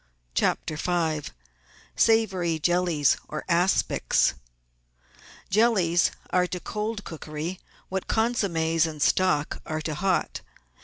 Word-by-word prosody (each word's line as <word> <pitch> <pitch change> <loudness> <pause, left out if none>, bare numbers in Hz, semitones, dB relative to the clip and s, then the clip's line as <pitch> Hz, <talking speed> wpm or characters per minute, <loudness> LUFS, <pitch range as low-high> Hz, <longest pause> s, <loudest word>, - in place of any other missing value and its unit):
CHAPTER 155 - 0
V 160 -3 -1 0.6
Savoury 190 -7 +2
Jellies 170 -3 +2
or 155 - -6
Aspics 180 +2 +2 1.2
Jellies 190 -6 +3 0.2
are 180 0 +2
to 180 - -4
cold 210 +2 -4
cookery 160 +2 -6 0.3
what 190 0 -4
consommes 165 -8 +1
and 155 -2 -7
stock 150 -1 +1
are 155 -1 -4
to 155 - -2
hot. 185 +4 -1
175 Hz, 100 wpm, -26 LUFS, 160-190 Hz, 1.2 s, Jellies